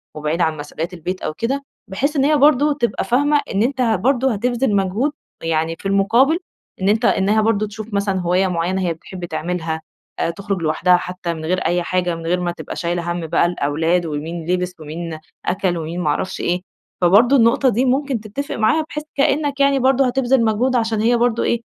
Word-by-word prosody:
وبعيد 155 Hz, +3 st, -2 dB
عن 160 Hz, -2 st, +1 dB
مسؤوليات 160 Hz, +4 st, -5 dB
البيت 180 Hz, +2 st, -5 dB
أو 155 Hz, -, -3 dB
كده. 270 Hz, -, -2 dB, 0.2 s
بحيث 275 Hz, +11 st, -1 dB
إن 275 Hz, -1 st, +3 dB
هي 300 Hz, 0 st, +4 dB
برضو 290 Hz, +1 st, +4 dB
تبقى 240 Hz, -5 st, -1 dB
فاهمة 290 Hz, +4 st, +2 dB
إن 200 Hz, +2 st, +2 dB
أنت 260 Hz, +1 st, -1 dB
ه 225 Hz, -3 st, +3 dB
برضو 260 Hz, +6 st, +2 dB
هتبذل 240 Hz, +1 st, 0 dB
مجهود 200 Hz, +9 st, +1 dB, 0.3 s
يعني 165 Hz, 0 st, 0 dB
في -, -, -16 dB
المقابل، 230 Hz, -, +3 dB, 0.4 s
إن 195 Hz, -, +2 dB
أنت 220 Hz, +2 st, +2 dB
إنّها 205 Hz, +3 st, +3 dB
برضو 215 Hz, -1 st, +1 dB
تشوف 215 Hz, +1 st, -8 dB
مثلًا 200 Hz, -1 st, 0 dB
هواية 180 Hz, +2 st, +2 dB
معيّنة 180 Hz, +2 st, -1 dB
هي 175 Hz, -2 st, 0 dB
بتحب 180 Hz, +2 st, -8 dB
تعملها، 160 Hz, -1 st, -3 dB, 0.5 s
تخرج 200 Hz, -3 st, -3 dB
لوحدها 175 Hz, +3 st, +3 dB
حتّى 180 Hz, -1 st, -4 dB
من 160 Hz, -1 st, -7 dB
غير 185 Hz, +2 st, 0 dB
أي 175 Hz, 0 st, +1 dB
حاجة، 180 Hz, -1 st, 0 dB
من 165 Hz, 0 st, -8 dB
غير 180 Hz, +2 st, +1 dB
ما 175 Hz, -1 st, -1 dB
تبقى 175 Hz, -, -7 dB
شايلة 175 Hz, 0 st, -2 dB
هَم 170 Hz, -2 st, -3 dB
بقى 165 Hz, -, +2 dB
الأولاد، 165 Hz, +1 st, 0 dB
ومين 160 Hz, +2 st, -4 dB
لبس، 180 Hz, 0 st, -1 dB
ومين 160 Hz, +1 st, -6 dB, 0.3 s
أكل، 185 Hz, -2 st, 0 dB
ومين 165 Hz, +2 st, -4 dB
ما 155 Hz, -, 0 dB
اعرفش 170 Hz, +5 st, -2 dB
إيه. 175 Hz, +1 st, 0 dB, 0.4 s
فبرضو 215 Hz, +10 st, +5 dB
النقطة 240 Hz, +2 st, +4 dB
دي 245 Hz, +4 st, +1 dB
ممكن 265 Hz, -1 st, 0 dB
تتفق 220 Hz, +7 st, -5 dB
معاها، 225 Hz, +9 st, +2 dB
بحيث 300 Hz, -, -5 dB
كأنّك 285 Hz, 0 st, +1 dB
يعني 275 Hz, 0 st, +4 dB
برضو 265 Hz, +1 st, +3 dB
هتبذل 255 Hz, -1 st, +2 dB
مجهود 245 Hz, +4 st, +1 dB
عشان 225 Hz, -2 st, +1 dB
هي 235 Hz, +2 st, +3 dB
برضو 235 Hz, -1 st, +1 dB
إيه، 235 Hz, 0 st, 0 dB
195 Hz, 195 wpm, -20 LUFS, 175-245 Hz, 0.5 s, فبرضو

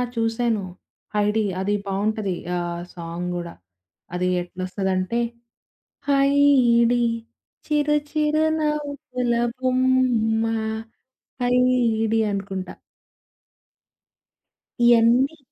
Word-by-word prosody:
చూసాను. 225 Hz, 0 st, 0 dB, 0.5 s
'హైడి' 210 Hz, +1 st, +1 dB, 0.2 s
అది 195 Hz, +2 st, 0 dB
బావుంటది. 200 Hz, +1 st, -1 dB, 0.2 s
ఆ -, -, 0 dB, 0.3 s
సాంగ్ 170 Hz, +1 st, -5 dB
గూడా. 170 Hz, -1 st, -5 dB, 0.6 s
అది 180 Hz, +1 st, 0 dB
ఎట్లొస్తదంటే, 185 Hz, +4 st, -2 dB, 0.9 s
హైడి. 275 Hz, -4 st, +4 dB, 0.7 s
చిరు 300 Hz, 0 st, +2 dB
చిరు 305 Hz, 0 st, +1 dB
నవ్వుల 285 Hz, -5 st, -2 dB, 0.2 s
బొమ్మా. 255 Hz, -3 st, +2 dB, 0.9 s
హైడి 245 Hz, -3 st, +2 dB
అనుకుంటా. 195 Hz, -1 st, -4 dB, 2.1 s
ఇయన్నీ... 240 Hz, +5 st, +4 dB
235 Hz, 65 wpm, -23 LUFS, 200-260 Hz, 2.1 s, హైడి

